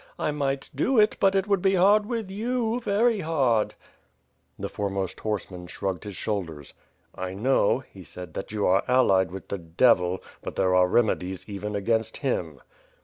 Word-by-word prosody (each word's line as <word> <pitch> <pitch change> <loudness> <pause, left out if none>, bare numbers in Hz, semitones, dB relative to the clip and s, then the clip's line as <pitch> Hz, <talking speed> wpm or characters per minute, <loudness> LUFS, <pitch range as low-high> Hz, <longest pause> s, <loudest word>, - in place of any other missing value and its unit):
I - - -1
might 140 -2 -2
do 235 - +1
it, 210 -1 +5
but 195 0 +3
it 195 -1 +2
would 200 -3 +2
be 195 0 +3
hard 205 +3 +4
with 225 -5 -3
you, 235 +2 -1
very 225 0 +2
hardP 135 - +1 0.8
The - - -4
foremost 100 -2 -3
horseman 95 -4 -4
shrugged 95 0 -4
his 100 -2 -7
shoulders. 85 -9 -4 0.4
"I 95 0 -5
know," 130 +2 +2
he 95 - -13
said, 90 -2 -10
"that 95 - -6
you 105 -2 -1
are 95 +2 +4
allied 100 -8 +4
with 95 +1 -9
the 100 - -3
Devil, 90 +1 +2 0.2
but - - -6
there 95 -1 +2
are 90 0 +5
remedies 95 -3 0
even 105 0 -5
against 110 +2 0
him." - - -2
110 Hz, 170 wpm, -26 LUFS, -, 0.8 s, it